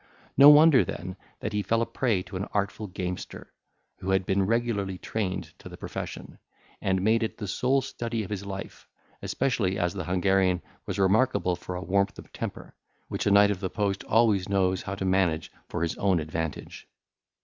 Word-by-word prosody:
No 140 Hz, +1 st, +10 dB
wonder 150 Hz, -5 st, +7 dB
then 90 Hz, +2 st, -6 dB, 0.3 s
that 105 Hz, -, -3 dB
he 105 Hz, -, +1 dB
fell 115 Hz, +4 st, +1 dB
a -, -, -1 dB
prey 115 Hz, -9 st, 0 dB
to 95 Hz, -, -10 dB
an 95 Hz, +2 st, -2 dB
artful 100 Hz, +1 st, -1 dB
gamester, 90 Hz, -1 st, -6 dB, 0.5 s
who 95 Hz, 0 st, -5 dB
had 95 Hz, -1 st, +2 dB
been 95 Hz, 0 st, +1 dB
regularly 110 Hz, -5 st, 0 dB
trained 95 Hz, -1 st, -3 dB
to -, -, -10 dB
the -, -, -10 dB
profession, -, -, -7 dB, 0.4 s
and 95 Hz, -1 st, 0 dB
made 110 Hz, +3 st, +3 dB
it 110 Hz, -, -2 dB
the 105 Hz, -, -5 dB
sole 130 Hz, +8 st, +1 dB
study 115 Hz, -4 st, -3 dB
of 100 Hz, -, -9 dB
his 100 Hz, -1 st, -3 dB
life; 100 Hz, 0 st, -7 dB, 0.3 s
especially 115 Hz, -8 st, 0 dB
as 85 Hz, 0 st, 0 dB
the 95 Hz, -4 st, -4 dB
Hungarian 95 Hz, 0 st, +2 dB, 0.2 s
was 100 Hz, -2 st, -3 dB
remarkable 100 Hz, -1 st, +2 dB
for 90 Hz, -, -7 dB
a 90 Hz, -, -4 dB
warmth 100 Hz, +1 st, +1 dB
of -, -, -12 dB
temper, -, -, -6 dB, 0.4 s
which -, -, -2 dB
a -, -, +4 dB
knight 100 Hz, +1 st, +6 dB
of 100 Hz, -, -3 dB
the 95 Hz, -1 st, -3 dB
post 100 Hz, -1 st, -1 dB
always 110 Hz, -5 st, +3 dB
knows 95 Hz, -2 st, +1 dB
how 100 Hz, -, -5 dB
to 95 Hz, -, -4 dB
manage 95 Hz, -4 st, +1 dB, 0.2 s
for -, -, -2 dB
his 85 Hz, -, -1 dB
own 95 Hz, -3 st, +2 dB
advantage. 80 Hz, 0 st, -5 dB
100 Hz, 190 wpm, -27 LUFS, 95-110 Hz, 0.5 s, No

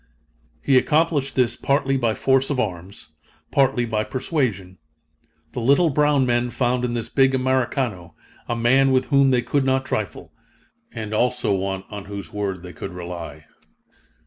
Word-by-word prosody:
He 135 Hz, -2 st, +5 dB
accomplished 150 Hz, -2 st, +1 dB
this, 120 Hz, -2 st, +2 dB
partly 135 Hz, -1 st, 0 dB
by 115 Hz, -4 st, 0 dB
force 135 Hz, 0 st, +2 dB
of 140 Hz, -3 st, -1 dB
arms, 90 Hz, -6 st, -5 dB, 0.4 s
partly 135 Hz, -3 st, +2 dB
by 110 Hz, -2 st, -1 dB
persuasion. 110 Hz, -, -2 dB, 0.7 s
The -, -, -5 dB
little 140 Hz, +7 st, +3 dB
brown 145 Hz, -1 st, +3 dB
men 120 Hz, 0 st, +1 dB
found 125 Hz, +1 st, 0 dB
in 120 Hz, -1 st, -1 dB
this 115 Hz, -2 st, -3 dB
big 135 Hz, -1 st, +3 dB
Americano 130 Hz, -, -1 dB, 0.3 s
a 120 Hz, -, -1 dB
man 130 Hz, +4 st, +3 dB
with 130 Hz, 0 st, +2 dB
whom 140 Hz, -1 st, +5 dB
they 125 Hz, -2 st, +2 dB
could 135 Hz, +3 st, 0 dB
not 130 Hz, 0 st, +1 dB
trifle, 105 Hz, -10 st, -4 dB, 0.6 s
and 110 Hz, -1 st, -6 dB
also 125 Hz, -1 st, +1 dB
one 95 Hz, 0 st, -2 dB
on 105 Hz, -1 st, -7 dB
whose 100 Hz, -4 st, -8 dB
word 100 Hz, -3 st, -3 dB
they 90 Hz, -1 st, -9 dB
could 95 Hz, +4 st, -7 dB
rely. 85 Hz, -4 st, -8 dB
120 Hz, 155 wpm, -22 LUFS, 100-135 Hz, 0.7 s, He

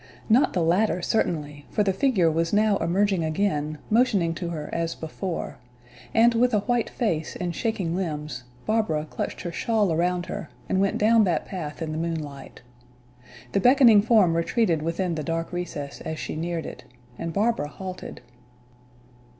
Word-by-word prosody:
Not 235 Hz, +5 st, +4 dB
the 180 Hz, -, +1 dB
latter, 180 Hz, +2 st, +2 dB
certainly, 150 Hz, -9 st, -1 dB
for 210 Hz, -, +1 dB
the 195 Hz, -1 st, +1 dB
figure 190 Hz, -7 st, +2 dB
was 165 Hz, +1 st, 0 dB
now 210 Hz, -1 st, +3 dB
emerging 185 Hz, +1 st, +1 dB
again, 155 Hz, -2 st, -1 dB
motioning 210 Hz, -8 st, +3 dB
to 170 Hz, 0 st, -4 dB
her 155 Hz, -3 st, -5 dB
as 165 Hz, 0 st, -1 dB
before; 165 Hz, +3 st, -5 dB, 0.5 s
and 235 Hz, +1 st, +5 dB
with 240 Hz, 0 st, +3 dB
a 205 Hz, -, +2 dB
white 240 Hz, +2 st, 0 dB
face 165 Hz, -10 st, -2 dB
and 175 Hz, -1 st, -3 dB
shaking 195 Hz, -5 st, -2 dB
limbs, 150 Hz, -7 st, -4 dB, 0.2 s
Barbara 215 Hz, -9 st, 0 dB
clutched -, -, -4 dB
her 175 Hz, -, -4 dB
shawl 210 Hz, 0 st, +1 dB
around 175 Hz, +2 st, 0 dB
her 160 Hz, -, -6 dB, 0.2 s
and 190 Hz, -, +1 dB
went 195 Hz, -, +1 dB
down 225 Hz, +1 st, +5 dB
that 170 Hz, -4 st, 0 dB
path 165 Hz, -4 st, -5 dB
in 155 Hz, -, -4 dB
the 155 Hz, -, -3 dB
moonlight. 155 Hz, -6 st, -5 dB, 0.9 s
The -, -, +2 dB
beckoning 245 Hz, -2 st, +7 dB
form 205 Hz, -6 st, +4 dB
retreated 170 Hz, -1 st, +1 dB
within 170 Hz, +2 st, -1 dB
the 155 Hz, -2 st, -3 dB
dark 165 Hz, +2 st, -3 dB
recess 155 Hz, -5 st, -5 dB
as 160 Hz, -, -4 dB
she -, -, -5 dB
neared 165 Hz, 0 st, -3 dB
it, -, -, -8 dB, 0.4 s
and 165 Hz, -, -3 dB
Barbara 205 Hz, -4 st, +1 dB
halted. 185 Hz, 0 st, -8 dB
175 Hz, 165 wpm, -25 LUFS, 160-210 Hz, 0.9 s, beckoning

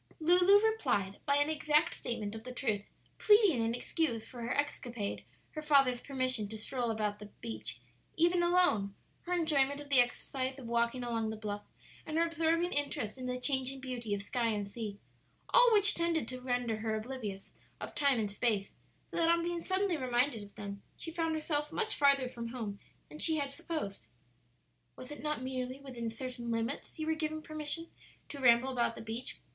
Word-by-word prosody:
Lulu 360 Hz, +5 st, +6 dB
replied 250 Hz, -, 0 dB
by 280 Hz, -, +4 dB
an 290 Hz, +2 st, +2 dB
exact 300 Hz, 0 st, +2 dB
statement 215 Hz, -3 st, -3 dB
of 220 Hz, 0 st, -7 dB
the 255 Hz, -, -7 dB
truth, 220 Hz, -5 st, -1 dB, 0.4 s
pleading 415 Hz, -, +5 dB
in 225 Hz, +1 st, 0 dB
excuse 245 Hz, -4 st, -1 dB
for 245 Hz, -, -9 dB
her 235 Hz, +3 st, -2 dB
escapade 240 Hz, -7 st, -2 dB, 0.3 s
her 310 Hz, -, -5 dB
father's 275 Hz, -5 st, +4 dB
permission 255 Hz, -5 st, -1 dB
to 220 Hz, +2 st, -6 dB
stroll 240 Hz, +2 st, -2 dB
about 210 Hz, -2 st, -1 dB
the 210 Hz, -, -9 dB
beach, 110 Hz, +1 st, -5 dB, 0.4 s
even 345 Hz, +2 st, +4 dB
alone, 345 Hz, -, +3 dB, 0.3 s
her 360 Hz, -, 0 dB
enjoyment 290 Hz, -5 st, +2 dB
of 290 Hz, -1 st, -9 dB
the 275 Hz, -2 st, +6 dB
exercise 260 Hz, +2 st, 0 dB
of 265 Hz, -, -9 dB
walking 235 Hz, +2 st, 0 dB
along 230 Hz, -2 st, -1 dB
the 220 Hz, -, -3 dB
bluff, 205 Hz, -1 st, -4 dB, 0.4 s
and 315 Hz, 0 st, -3 dB
her 335 Hz, -, +4 dB
absorbing 335 Hz, +1 st, +1 dB
interest 265 Hz, -5 st, -2 dB
in 255 Hz, -, -4 dB
the 250 Hz, 0 st, -2 dB
changing 265 Hz, 0 st, +2 dB
beauty 245 Hz, -5 st, -3 dB
of 200 Hz, -, -5 dB
sky 235 Hz, +3 st, 0 dB
and 210 Hz, -3 st, -1 dB
sea 210 Hz, -1 st, -5 dB, 0.5 s
all -, -, +7 dB
which 410 Hz, -2 st, +6 dB
tended 335 Hz, -6 st, 0 dB
to 255 Hz, +1 st, -5 dB
render 245 Hz, -3 st, -1 dB
her 220 Hz, 0 st, -1 dB
oblivious 215 Hz, -4 st, -5 dB, 0.3 s
of -, -, -6 dB
time 280 Hz, -3 st, +3 dB
and 210 Hz, -2 st, -1 dB
space, 205 Hz, -2 st, 0 dB, 0.4 s
so -, -, -4 dB
that 330 Hz, -1 st, +3 dB
on 335 Hz, 0 st, +3 dB
being 345 Hz, 0 st, -2 dB
suddenly 375 Hz, -1 st, +1 dB
reminded 250 Hz, -2 st, +1 dB
of 205 Hz, 0 st, -12 dB
them 200 Hz, -1 st, -7 dB, 0.2 s
she 330 Hz, -, -6 dB
found 325 Hz, -1 st, -1 dB
herself 300 Hz, -1 st, -1 dB
much 435 Hz, +5 st, 0 dB
farther 280 Hz, -2 st, +4 dB
from 235 Hz, -2 st, -6 dB
home 225 Hz, -4 st, -5 dB, 0.3 s
than 305 Hz, -, -11 dB
she 320 Hz, -, +2 dB
had 280 Hz, -2 st, -1 dB
supposed. 280 Hz, -, -5 dB, 0.9 s
"Was 255 Hz, +2 st, -10 dB
it 295 Hz, -, -7 dB
not 300 Hz, -3 st, -2 dB
merely 255 Hz, 0 st, -3 dB
within 250 Hz, -4 st, -5 dB
certain 240 Hz, +1 st, -5 dB
limits 230 Hz, +4 st, -3 dB
you 315 Hz, -, -3 dB
were 320 Hz, -, +1 dB
given 310 Hz, 0 st, -3 dB
permission 310 Hz, +2 st, -5 dB, 0.4 s
to 285 Hz, -, -7 dB
ramble 250 Hz, 0 st, +5 dB
about 235 Hz, -2 st, 0 dB
the -, -, -8 dB
beach?" 230 Hz, +3 st, -5 dB
255 Hz, 190 wpm, -33 LUFS, 230-310 Hz, 0.9 s, all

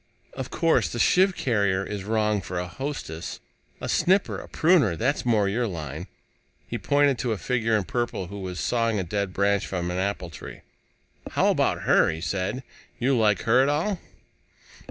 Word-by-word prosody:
Of 130 Hz, -1 st, -5 dB
course 165 Hz, -8 st, +2 dB
the -, -, -4 dB
sheave 185 Hz, +8 st, +4 dB
carrier 100 Hz, -6 st, +1 dB
is 100 Hz, -2 st, -5 dB
wrong 105 Hz, -1 st, +1 dB
for 90 Hz, 0 st, -5 dB
a 90 Hz, -, -1 dB
hostess! 85 Hz, -, -5 dB, 0.4 s
A -, -, -5 dB
snipper, 190 Hz, +2 st, +2 dB
a -, -, -11 dB
pruner 155 Hz, -, +3 dB
that's 125 Hz, -, -1 dB
more 105 Hz, -4 st, +3 dB
your 115 Hz, +4 st, 0 dB
line." 80 Hz, -2 st, -6 dB, 0.6 s
He -, -, -4 dB
pointed 145 Hz, -2 st, +2 dB
to 120 Hz, -3 st, 0 dB
a -, -, -3 dB
figure 115 Hz, -1 st, +1 dB
in 105 Hz, -, -1 dB
purple 120 Hz, -2 st, -2 dB
who 100 Hz, +3 st, -8 dB
was 90 Hz, -2 st, -5 dB
sawing 115 Hz, -2 st, +1 dB
a -, -, -1 dB
dead 100 Hz, +2 st, -2 dB
branch 100 Hz, +1 st, +1 dB
from 90 Hz, -2 st, -2 dB
an 90 Hz, -, -2 dB
apple 95 Hz, -3 st, -2 dB
tree. -, -, -10 dB, 0.7 s
"How -, -, +3 dB
about -, -, +1 dB
her?" -, -, +4 dB
he 80 Hz, -, -3 dB
said. 100 Hz, +8 st, -2 dB, 0.3 s
"You 130 Hz, +2 st, +2 dB
like 105 Hz, -5 st, +3 dB
her 120 Hz, +3 st, +4 dB
at 135 Hz, -, +3 dB
all?" 170 Hz, +6 st, 0 dB
105 Hz, 180 wpm, -25 LUFS, 95-130 Hz, 0.7 s, sheave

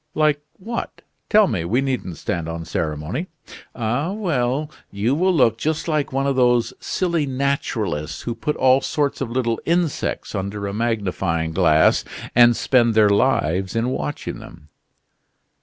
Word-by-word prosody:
"Like 150 Hz, -1 st, +2 dB
what? 230 Hz, +5 st, -6 dB, 0.3 s
Tell 215 Hz, -1 st, +6 dB
me, 95 Hz, -, -1 dB
we 110 Hz, +9 st, +1 dB
needn't 130 Hz, -, -2 dB
stand 85 Hz, -2 st, -3 dB
on 85 Hz, 0 st, -5 dB
ceremony." 80 Hz, -, -3 dB, 0.5 s
"Ah, 125 Hz, +9 st, -1 dB
well! 150 Hz, -, -1 dB, 0.2 s
You 105 Hz, +6 st, 0 dB
will 185 Hz, +6 st, +2 dB
look 115 Hz, -9 st, +3 dB
just 155 Hz, +4 st, -1 dB
like 155 Hz, -3 st, 0 dB
one 135 Hz, +1 st, 0 dB
of 140 Hz, -1 st, +1 dB
those 120 Hz, -1 st, +3 dB
silly 170 Hz, -5 st, -1 dB
naturalists 115 Hz, -, -2 dB
who 120 Hz, -, -2 dB
put 150 Hz, +6 st, -2 dB
all 130 Hz, +1 st, +4 dB
sorts 145 Hz, 0 st, -1 dB
of 130 Hz, -, -2 dB
little 120 Hz, -2 st, -1 dB
insects 170 Hz, -2 st, -1 dB
under 100 Hz, +1 st, -3 dB
a 100 Hz, -, -3 dB
magnifying 100 Hz, -7 st, -1 dB
glass, 80 Hz, -2 st, +4 dB, 0.3 s
and 120 Hz, 0 st, +6 dB
spend 120 Hz, -3 st, +2 dB
their 105 Hz, -2 st, +5 dB
lives 95 Hz, -4 st, +1 dB
in 115 Hz, +2 st, +1 dB
watching 75 Hz, -, -4 dB
them." 75 Hz, -, -13 dB
120 Hz, 150 wpm, -21 LUFS, 100-140 Hz, 0.5 s, Tell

